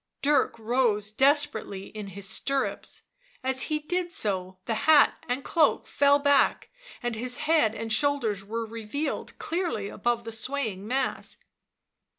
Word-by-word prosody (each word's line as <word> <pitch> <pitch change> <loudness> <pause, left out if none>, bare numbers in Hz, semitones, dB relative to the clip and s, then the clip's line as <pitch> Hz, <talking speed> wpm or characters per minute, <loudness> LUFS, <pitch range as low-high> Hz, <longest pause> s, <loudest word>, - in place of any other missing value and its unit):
Dirk 290 -3 +2
rose 220 -2 +1
desperately 265 -6 +2
in 210 -2 -7
his 195 +1 -6
stirrups; 275 +6 -2 0.4
as 260 0 +2
he 305 - +1
did 350 +3 -2
so 190 - -1
the 230 - -1 0.2
hat 305 -2 +5
and 255 +2 -1
cloak 315 -4 +2
fell 285 0 +4
back 285 -1 +2 0.3
and 240 -1 -1
his 250 +3 -2
head 300 -9 +3
and 225 -1 -3
shoulders 235 -7 +1
were 225 +3 -4
revealed 230 +7 -4
clearly 345 - -2
aboye 235 +2 -1
the 225 - -6
swaying 220 -4 -2
mass. 265 +3 -1
245 Hz, 140 wpm, -27 LUFS, 215-285 Hz, 0.4 s, hat